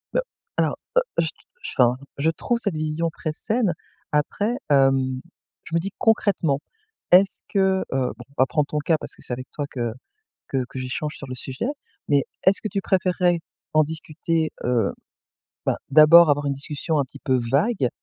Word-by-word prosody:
Heu, - - +4 0.4
alors, - - +2 0.2
heu, - - +7 0.2
je - - +3
t - - +1 0.3
je - - -3
enfin, 125 -1 +5 0.2
je 150 +3 +2
trouve 235 +8 -1
cette 200 -7 -2
vision 155 +2 -1
très 155 0 -4
saine. 215 +2 0 0.4
Après, 205 +10 0
hem, 135 -2 +3 0.4
je 165 - -5
me - - +4
dis 195 +4 -3
concrètement, 195 -10 +2 0.5
est-ce 190 +2 +6
que, 190 -1 +2
heu, 130 -2 0
bon, 125 - -11
on 140 - -24
va 130 - +7
prendre 150 0 0
ton 150 - -1
cas 155 +2 +2
parce - - -6
que - - -17
c'est 125 - -3
avec 130 +1 -6
toi 145 - -3
que 120 -3 -2 0.6
que 130 -2 0
que 130 - -7
j'échange 130 +4 -3
sur 140 - -8
le 130 - -4
sujet, 130 - -2 0.4
mais 140 -2 +3 0.2
est-ce 195 +1 +5
que 215 - -2
tu 195 - -1
préférerais 180 -2 +2 0.3
en 155 - +5
discuter, 160 +1 -1
heu, 120 -5 +1 0.7
bah - - +2
d'abord 155 +2 +8
avoir 145 0 +1
une 140 - +1
discussion 150 +3 -1
un 140 - +2
petit 135 +1 -13
peu 130 -3 +1
vague 150 - +2
155 Hz, 190 wpm, -23 LUFS, 135-180 Hz, 0.7 s, d'abord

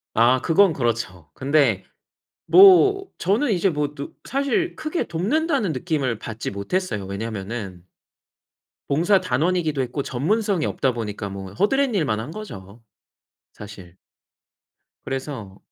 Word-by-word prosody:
아 125 +3 +4
그건 170 0 +4
그렇죠. 110 - -3
근데 135 -8 +1 0.6
뭐 390 +1 +7
저는 215 +9 +1
이제 190 +1 +2
뭐 150 -1 -2
느 140 - -6 0.2
사실 280 +7 -1
크게 310 +3 -2
돕는다는 220 - 0
느낌을 140 - -2
받지 110 -1 -5
못했어요. 100 - -3
왜냐면은 100 -2 -6 1.0
봉사단원이기도 165 -2 +1
했고 130 +3 -3
전문성이 190 - 0
없다 130 -3 0
보니까 105 -3 -5
뭐 95 -1 -8
허드렛일만 205 - +1
한 125 +7 -6
거죠, 115 - -10 0.7
사실. 95 -4 -12 1.1
그래서 130 -8 -5
140 Hz, 260 characters per minute, -23 LUFS, -, 1.1 s, 뭐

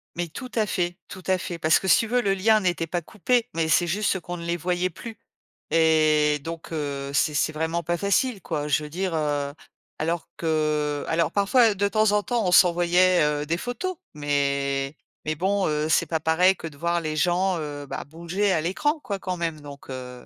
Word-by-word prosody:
Mais 175 0 -2
tout 255 - -8
à 220 -2 +2
fait, 175 -2 -2
tout 185 - -10
à 185 0 +3
fait. 175 -1 -6
Parce 155 0 +4
que 190 - -5
si - - +6
tu 225 - -1
veux, 245 +2 +2
le 195 -3 +1
lien 215 +3 +3
n'était 175 -3 -1
pas 175 +1 -2
coupé 225 +7 0
mais 165 -1 0
c'est 175 +2 +3
juste 195 +1 0
qu'on 175 0 -6
ne 170 - -7
les 170 0 -1
voyait 180 +2 -1
plus 225 +6 -10 0.5
et 155 -2 +3
donc 165 0 -7
heu, 140 -3 -3
c'est 150 +2 +2
c'est 150 +2 +1
vraiment 160 +2 -2
pas 175 +2 -1
facile 200 +3 +1
quoi. 150 -3 -3
Je 150 +2 +2
veux 150 - -7
dire, 180 +2 -2
heu, 145 -2 -1 0.5
alors 165 0 -2
que, 155 -2 0
alors 165 0 +2
parfois 215 +2 +4
de 200 +1 0
temps 215 -1 +2
en 205 0 +2
temps 240 -5 -1
on - - +1
s'envoyait, 175 0 +5
heu, 150 0 0
des 165 +3 -1
photos 350 - -4 0.2
mais 140 -1 -1 0.3
mais 155 0 -1
bon, 190 +4 0
heu, 150 +1 -1
c'est - - +3
pas 160 -2 -1
pareil 180 +4 +4
que 165 - -7
de 145 -3 -12
voir 170 +1 0
les 155 -1 -3
gens, 180 +2 +2
heu 145 -1 -6
bah, 135 - -6
bouger 170 +6 -1
à 160 - +1
l'écran 295 - 0
quoi 200 -2 -4
quand 185 -1 -3
même, 165 -2 -3
donc, 140 -1 -11
heu 125 -1 -8
170 Hz, 215 wpm, -25 LUFS, 150-190 Hz, 0.5 s, si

